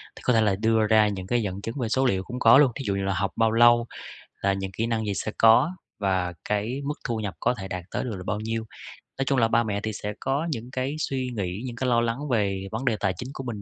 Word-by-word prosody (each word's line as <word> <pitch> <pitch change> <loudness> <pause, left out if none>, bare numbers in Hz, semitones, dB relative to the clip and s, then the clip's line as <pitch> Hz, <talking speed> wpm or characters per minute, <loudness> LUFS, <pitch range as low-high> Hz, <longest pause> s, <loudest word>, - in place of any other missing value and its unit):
Thì - - -12
có 125 - +3
thể 110 - +4
là 105 -3 +2
đưa 110 +1 +2
ra 110 0 +5
những 95 -3 -4
cái 120 +3 +1
dẫn 100 -2 -4
chứng 115 +2 -5
về 120 -3 -1
số 130 +3 +2
liệu 95 -7 +1
cũng 125 +5 -6
có 115 +1 +7
luôn, 140 -3 +5
thí 140 - -5
dụ 100 - +1
như 100 - -2
là 95 0 0
học 95 +1 -1
bao 115 -1 +3
lâu, 120 +1 +5 0.6
là 100 - +2
những 95 0 -3
kỹ 110 +4 -2
năng 115 -1 -1
gì 100 - -1
sẽ 110 - -3
có 115 +8 +6 0.3
và 95 -3 0
cái 105 +6 -1
mức 145 +1 -2
thu 115 - -1
nhập 100 -3 -4
có 125 - +2
thể 95 -5 -7
đạt 90 -2 -5
tới - - -2
được 115 -5 -4
là 90 - -7
bao 105 -1 -1
nhiêu. 115 +1 -3 0.5
Nói 135 - -1
chung 135 0 +1
là 115 - +4
ba 115 +1 +3
mẹ 105 -2 -2
thì 110 - -2
sẽ 105 +1 -4
có 140 +5 -1
những 120 -2 -5
cái 130 +2 -2
suy 130 -4 -2
nghĩ, 95 0 -3
những 120 -2 -5
cái 125 +2 -1
lo 120 -1 +3
lắng 120 +6 -2
về 100 -5 0
vấn 115 +4 -4
đề 120 - +2
tài 95 -2 0
chính 125 - -6
của 135 - -6
mình 115 -5 -5
110 Hz, 290 wpm, -25 LUFS, 100-125 Hz, 0.6 s, có